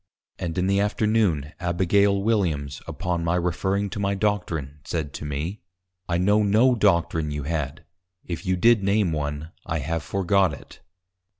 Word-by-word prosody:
_ - - -6
And 85 0 -3
in 90 - +1
the 100 +1 +2
Afternoon, 105 -8 +1
Abigail 95 +3 +2
Williams, 80 -11 0
upon 90 -1 -2
my 85 +1 +1
referring 95 +3 0
to - - -4
my 100 0 0
Doctrine, 85 -9 -2
said 75 -4 -3
to - - -6
me, 75 +8 -4 0.5
_I 85 0 +1
know 105 +4 +3
no 110 +5 +4
Doctrine 85 -7 +2
you 75 -1 -3
had, 75 +1 -3 0.4
If 85 0 -5
you 95 -2 +1
did 115 +4 +4
name 100 -2 +2
one, 75 +1 -3
I 80 -1 -2
have 80 +2 -2
forgot 95 +1 +1
it. 70 - -12
90 Hz, 165 wpm, -24 LUFS, 80-100 Hz, 0.5 s, no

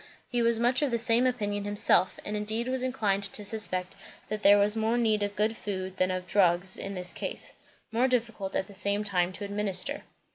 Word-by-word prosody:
He 245 -1 -1
was 230 0 +2
much 240 +3 +2
of 290 - +1
the 235 - 0
same 235 +2 +3
opinion 205 -5 -2
himself; 205 -3 +2
and 210 - -3
indeed 215 +3 -2
was 260 0 -1
inclined 220 -6 0
to 205 +1 -6
suspect 185 -4 0 0.4
that 215 0 -3
there 205 -1 +7
was 205 +1 +5
more 225 +2 0
need 220 -3 +1
of 205 0 -2
good 215 +2 0
food 190 -3 -5
than 185 - +1
of 185 0 -3
drugs 180 -1 +3
in 195 0 -4
this 180 -1 +1
case. - - -5 0.4
More 240 +3 +2
difficult 230 -6 -2
at - - 0
the 200 - -14
same 200 +2 0
time 180 -3 0
to 205 - -6
administer. 205 +6 0
210 Hz, 210 wpm, -28 LUFS, 195-230 Hz, 0.4 s, there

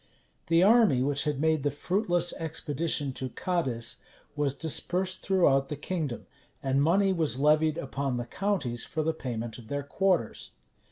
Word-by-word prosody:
The 165 +1 +4
army 210 - +5
which 140 +1 0
had 150 -2 -1
made 160 0 +2
the 145 - +1
fruitless 175 +3 0
expedition 155 -2 -2
to 130 0 -4
Cadiz, 130 -8 -2 0.4
was 145 -2 0
dispersed 180 +5 -1
throughout 140 -8 +3
the 150 - -3
kingdom; 150 -4 -4 0.4
and 135 0 +2
money 190 +6 +3
was 155 -8 0
levied 155 +2 +3
upon 135 -1 -2
the 120 - -3
counties 145 - -1
for 155 - -3
the 160 +1 0
payment 120 -6 -5
of 115 - -13
their 145 +2 -3
quarters. 175 - 0
150 Hz, 155 wpm, -28 LUFS, 135-175 Hz, 0.4 s, army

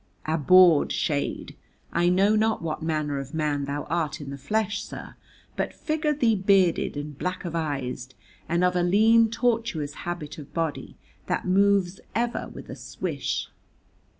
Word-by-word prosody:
Abhorred 160 +1 +5
shade! 145 -3 -2 0.4
I 175 +1 +3
know 195 +4 +4
not 220 -3 +1
what 160 +1 -3
manner 155 -3 -1
of 135 +3 -7
man 150 -3 0
thou 140 +1 -3
art 160 -2 -2
in 140 -2 -7
the 140 - -6
flesh, 215 +9 -1
sir, - - -9 0.4
but - - -3
figure 310 -1 -1
thee 240 -7 +2
bearded 190 -6 +2
and 145 0 -5
blackavised, 145 -7 -4 0.3
and 170 +2 +1
of 180 0 +2
a 180 - +2
lean 220 +5 +5
tortuous 225 - -1
habit 170 -4 -6
of 145 - -12
body, 165 -3 -3 0.3
that - - -1
moves 195 -1 +2 0.2
ever 235 +1 -1
with - - -10
a - - -7
swish. - - -4
175 Hz, 150 wpm, -26 LUFS, 150-200 Hz, 0.4 s, Abhorred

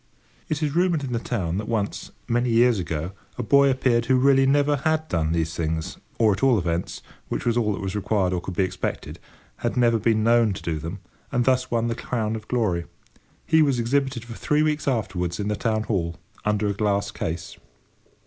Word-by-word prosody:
It 155 0 -1
is 150 0 -1
rumoured 175 -4 +2
in 130 -3 -3
the 115 - 0
town 95 -7 -2
that 105 - -5
once, 110 -3 -2 0.2
many 120 +1 +1
years 115 -1 +4
ago, 80 0 -3 0.3
a 125 - -2
boy 140 +4 +5
appeared 120 -3 +1
who 130 - +4
really 135 +1 +4
never 145 +1 +3
had 155 +2 0
done 80 -2 0
these 80 -1 0
things—or 80 +7 -1
at 95 - -5
all 135 -3 +4
events, 85 -1 -2 0.3
which - - -3
was 120 -1 +2
all 115 -3 +1
that 100 - -5
was 95 +1 -3
required 100 -2 0
or 90 - -1
could 90 0 -6
be 95 - +2
expected, 95 - -4 0.4
had - - -2
never 120 -2 +3
been 110 -1 +2
known 115 -2 +4
to 95 - -8
do 80 -2 -2
them—and 95 - -5
thus 130 -1 +2
won 115 -1 0
the 115 - 0
crown 115 -2 -2
of 110 -1 -8
glory. 100 -9 0 0.6
He 160 0 +4
was 140 -4 +3
exhibited 130 0 0
for 120 - -8
three 150 +6 +1
weeks 155 -1 -1
afterwards 95 -8 -1
in 105 0 -1
the 105 - 0
Town 110 0 0
Hall, 85 -6 -1 0.3
under 105 0 +1
a 100 - +1
glass 100 -1 0
case. 80 +1 -5
115 Hz, 205 wpm, -24 LUFS, 95-130 Hz, 0.6 s, boy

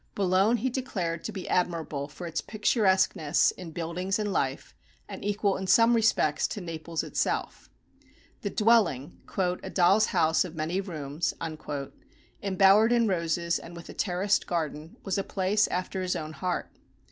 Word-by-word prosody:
Boulogne 195 +4 +3
he 255 +4 -1
declared 185 -11 -3
to - - -4
be 190 - -7
admirable 165 -5 -1
for 160 +4 -9
its 165 -1 -3
picturesqueness 190 - +2
in 180 -3 -9
buildings 175 +4 -2
and 210 -2 -2
life, 135 -4 -2 0.3
and - - -8
equal 205 -1 0
in 190 - -5
some 230 +5 +5
respects 215 -9 +2
to - - -5
Naples 165 -2 -4
itself. - - -2 0.7
The 205 - -2
dwelling, 210 - +2 0.2
"a 180 -2 -1
doll's 190 +4 +4
house 160 0 +2
of 175 -3 -8
many 165 +4 -1
rooms," 155 -4 -3 1.1
embowered 195 +3 +5
in 235 -1 +3
roses, 170 -2 0
and 170 - -11
with 170 - -10
a - - -7
terraced 195 +1 0
garden, 160 -2 -3
was 195 0 -1
a - - -1
place 200 +3 +1
after 185 +1 -3
his 185 -1 -1
own 155 0 -5
heart. 180 +2 -3
185 Hz, 155 wpm, -28 LUFS, 165-205 Hz, 1.1 s, some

